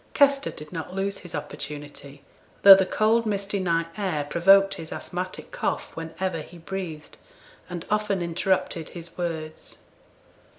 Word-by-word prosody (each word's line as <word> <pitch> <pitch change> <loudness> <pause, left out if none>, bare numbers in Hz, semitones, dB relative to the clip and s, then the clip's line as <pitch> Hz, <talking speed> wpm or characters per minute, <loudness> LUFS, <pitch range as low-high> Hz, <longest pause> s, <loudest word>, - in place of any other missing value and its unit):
Kester 280 -1 +4
did 150 +3 -10
not 165 +2 -5
lose 195 +1 -1
his 175 -3 -8
opportunity, 145 -1 -7 0.4
though 200 - +13
the 190 -1 +4
cold 225 +1 +2
misty 200 -1 -1
night 165 -3 +1
air 185 -8 -1
provoked 195 +6 +5
his 165 -5 -8
asthmatic 180 +1 -5
cough - - -3
when 165 0 -7
ever 185 -4 -1
he 175 +3 -12
breathed, 170 -3 -6 0.5
and 175 -2 -6
often 210 -2 +1
interrupted 170 -1 -1
his 170 -1 -9
words. 160 -3 -5
175 Hz, 140 wpm, -25 LUFS, 160-195 Hz, 0.5 s, though